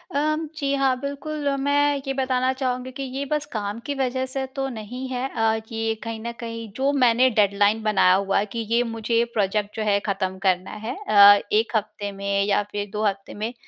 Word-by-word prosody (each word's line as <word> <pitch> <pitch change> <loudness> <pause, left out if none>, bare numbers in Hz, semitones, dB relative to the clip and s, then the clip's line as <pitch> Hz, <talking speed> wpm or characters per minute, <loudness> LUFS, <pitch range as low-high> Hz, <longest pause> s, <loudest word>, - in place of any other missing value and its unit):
अ, - - +3 0.4
जी 280 -1 0
हाँ 270 -2 +2
बिल्कुल, 285 +2 -4
मैं 285 +1 +2
ये 270 - 0
बताना 260 -1 +1
चाहूँगी 255 -1 -3
कि 275 +1 -6
ये 270 +2 -4
बस 300 -1 0
काम 210 0 -3
की 285 - -2
वज़ह 260 -1 -1
से 265 +1 -3
तो 270 0 -1
नहीं 245 +3 -6
है। 255 +1 -2
अ, 225 -1 +1
ये 225 0 -1
कहीं 230 -1 -5
ना 235 +1 -4
कहीं, 230 -1 -7
जो 275 +2 +1
मैंने 255 -1 +4
डेडलाइन 205 0 +2
बनाया 195 -4 +4
हुआ 195 +1 +2
है 205 - 0
कि 230 - -3
ये 235 +1 +3
मुझे 230 0 0
प्रोजेक्ट 205 0 0
जो 220 - -2
है 200 0 +3
खत्म 190 -2 -2
करना 185 0 +1
है। 250 - -3
अ, 205 0 +9
1 220 +2 +1
हफ़्ते 205 -1 -2
में 200 0 -1
या 205 0 +2
फिर 205 -1 -4
2 210 - -2
हफ़्ते 195 -1 -2
में, 220 +3 -4
230 Hz, 205 wpm, -23 LUFS, 205-260 Hz, 0.4 s, अ